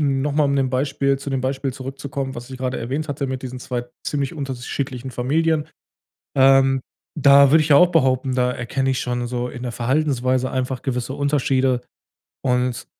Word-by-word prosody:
noch 140 Hz, 0 st, +1 dB
mal 150 Hz, +1 st, +3 dB
um 140 Hz, 0 st, +1 dB
dem 135 Hz, -1 st, +1 dB
Beispiel 135 Hz, +1 st, 0 dB
zu 140 Hz, -, -6 dB
dem 135 Hz, -, -1 dB
Beispiel 135 Hz, +1 st, -2 dB
zurückzukommen, 135 Hz, 0 st, -5 dB
was 120 Hz, +2 st, -9 dB
ich 130 Hz, -, -6 dB
grade 130 Hz, 0 st, -2 dB
erwähnt 135 Hz, +7 st, -3 dB
hatte 140 Hz, 0 st, -2 dB
mit 130 Hz, -1 st, -4 dB
diesen 130 Hz, -1 st, -6 dB
2 125 Hz, -1 st, -3 dB, 0.2 s
ziemlich 140 Hz, -1 st, -2 dB
unterschiedlichen 130 Hz, -2 st, -4 dB
Familien. 150 Hz, +5 st, 0 dB, 0.7 s
Ähm, 135 Hz, 0 st, +5 dB, 0.4 s
da 140 Hz, -1 st, +7 dB
würde 155 Hz, +1 st, +6 dB
ich 155 Hz, -, -3 dB
ja 140 Hz, -, +8 dB
auch 180 Hz, +4 st, +6 dB
behaupten, 130 Hz, -5 st, +2 dB
da 125 Hz, -1 st, +1 dB
erkenne 135 Hz, +2 st, -1 dB
ich 130 Hz, -, -1 dB
schon 120 Hz, -1 st, -2 dB
so 125 Hz, 0 st, -3 dB
in 125 Hz, 0 st, -8 dB
der 120 Hz, -, -3 dB
Verhaltensweise 130 Hz, 0 st, 0 dB
einfach 130 Hz, 0 st, -2 dB
gewisse 125 Hz, 0 st, -3 dB
Unterschiede 135 Hz, -3 st, +1 dB, 0.6 s
und 125 Hz, -1 st, 0 dB
135 Hz, 180 wpm, -21 LUFS, 125-140 Hz, 0.7 s, ja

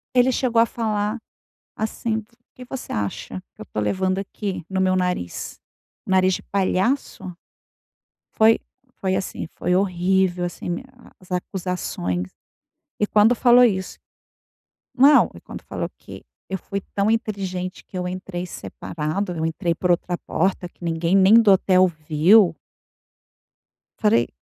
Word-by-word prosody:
ele 250 Hz, +1 st, +5 dB
chegou 240 Hz, -2 st, +2 dB
a 230 Hz, -, +5 dB
falar 215 Hz, -1 st, -2 dB, 0.6 s
assim: 220 Hz, +1 st, -2 dB
"O 220 Hz, -, -11 dB, 0.3 s
que 250 Hz, -, -10 dB
você 260 Hz, +1 st, -7 dB
acha 100 Hz, -2 st, -4 dB
que -, -, -14 dB
eu -, -, -4 dB
estou 105 Hz, -, -4 dB
levando 185 Hz, -, 0 dB
aqui 195 Hz, -2 st, -5 dB
no 190 Hz, -1 st, 0 dB
meu 185 Hz, 0 st, +2 dB
nariz, 180 Hz, -, -3 dB, 0.5 s
nariz 185 Hz, 0 st, +3 dB
de -, -, -8 dB
palhaço?" 195 Hz, +1 st, -1 dB, 1.0 s
Foi 220 Hz, +1 st, +4 dB, 0.4 s
foi 190 Hz, -1 st, 0 dB
assim 185 Hz, -, -4 dB
foi 180 Hz, -, 0 dB
horrível 185 Hz, -1 st, +1 dB
assim 175 Hz, 0 st, -4 dB, 0.2 s
a 245 Hz, -, -18 dB
as 185 Hz, 0 st, -19 dB
acusações 175 Hz, -, -3 dB, 0.7 s
e 210 Hz, -, +2 dB
quando 215 Hz, +3 st, +5 dB
falou 245 Hz, +1 st, +6 dB
isso 190 Hz, -6 st, 0 dB, 1.0 s
Não, 280 Hz, +3 st, +6 dB
e -, -, -11 dB
quando -, -, -10 dB
falou -, -, -4 dB
que: -, -, -12 dB, 0.3 s
"Eu 190 Hz, -, -2 dB
fui 200 Hz, +2 st, -5 dB
tão 200 Hz, +2 st, +2 dB
inteligente 190 Hz, -5 st, -3 dB
que -, -, -11 dB
eu 180 Hz, -, -2 dB
entrei 180 Hz, -1 st, -5 dB
separado, 170 Hz, +2 st, -4 dB
eu 160 Hz, -2 st, -2 dB
entrei 165 Hz, +1 st, -1 dB
por 180 Hz, +2 st, -1 dB
outra 175 Hz, 0 st, -1 dB
porta, 180 Hz, +1 st, -1 dB
que 175 Hz, -, -14 dB
ninguém 165 Hz, +2 st, +1 dB
nem 195 Hz, +2 st, +6 dB
do 225 Hz, -3 st, +7 dB
hotel 185 Hz, -1 st, +4 dB
viu." 165 Hz, +4 st, +4 dB, 1.5 s
Falei: 115 Hz, +3 st, +3 dB
185 Hz, 140 wpm, -22 LUFS, 175-210 Hz, 1.5 s, do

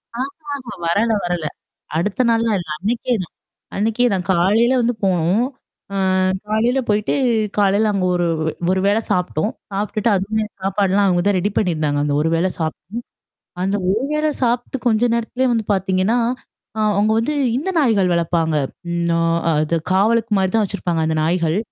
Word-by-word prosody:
ஆமா, 255 Hz, +2 st, -1 dB, 0.3 s
ஆமா. 240 Hz, -6 st, -9 dB
வரல, 210 Hz, +7 st, +2 dB
வரல. 175 Hz, -2 st, -2 dB, 0.5 s
அடுத்த 205 Hz, +8 st, 0 dB
நாள்லாம் 230 Hz, -1 st, +2 dB
இல்ல. 170 Hz, -, -7 dB
அன்னக்கே 235 Hz, +5 st, -1 dB
தான். -, -, -13 dB, 0.4 s
அன்னக்கே 225 Hz, +4 st, +1 dB
நான் 180 Hz, -3 st, -2 dB
காலையில 210 Hz, +8 st, +3 dB
வந்து 240 Hz, +1 st, +1 dB
போனோம். 185 Hz, +5 st, +2 dB, 0.5 s
அ -, -, -3 dB, 0.5 s
காலையில 230 Hz, +5 st, +2 dB
போயி்ட்டு 210 Hz, 0 st, +1 dB, 0.4 s
காலையில 205 Hz, +1 st, +3 dB
அங்க 190 Hz, -2 st, 0 dB
ஒரு 175 Hz, -, +1 dB, 0.2 s
வே, 160 Hz, -, 0 dB, 0.2 s
ஒரு 190 Hz, 0 st, +1 dB
வேள 205 Hz, +2 st, +3 dB
சாப்புட்டோம். 180 Hz, +2 st, 0 dB, 0.2 s
சாப்புட்டுட்டு 210 Hz, +2 st, -1 dB
அதுமே 215 Hz, +3 st, -1 dB, 0.2 s
சாப்பாடுலாம் 195 Hz, +1 st, +2 dB
அங்க 175 Hz, -1 st, +2 dB
தான் 200 Hz, -2 st, +3 dB
ரெடி 205 Hz, +3 st, -1 dB
பண்ணியிருந்தாங்க. 155 Hz, -6 st, 0 dB
அந்த 145 Hz, -, 0 dB
ஒரு 160 Hz, -, +1 dB
வேள 170 Hz, +3 st, +2 dB
சாப் 160 Hz, -1 st, -1 dB, 0.9 s
அந்த 195 Hz, +2 st, 0 dB
ஒரு 220 Hz, +6 st, 0 dB
வேளை 305 Hz, 0 st, +1 dB
சாப்பிட்டு 245 Hz, +2 st, 0 dB
கொஞ்ச 225 Hz, 0 st, +3 dB
நேரத்திலேயே 235 Hz, +3 st, 0 dB
வந்து 225 Hz, -2 st, -1 dB
பார்த்தீங்கன்னா, 190 Hz, +3 st, +1 dB, 0.6 s
ஆ -, -, -2 dB, 0.2 s
அவுங்க 210 Hz, +2 st, +2 dB
வந்து 235 Hz, +7 st, -1 dB, 0.2 s
இந்த 310 Hz, +8 st, -2 dB
நாய்கள் 210 Hz, -, +3 dB
வளர்ப்பாங்க. 165 Hz, -2 st, +1 dB, 0.3 s
ம் 170 Hz, 0 st, -1 dB
ஆ, -, -, +1 dB, 0.4 s
அது 155 Hz, +2 st, 0 dB, 0.2 s
காவலுக்குமாரி 210 Hz, -1 st, +2 dB
தான் 220 Hz, -, +3 dB
வச்சிருப்பாங்க 175 Hz, -4 st, -2 dB
அந்த 160 Hz, -, 0 dB
நாய்கள். 165 Hz, +1 st, +1 dB
200 Hz, 155 wpm, -20 LUFS, 175-225 Hz, 0.9 s, காலையில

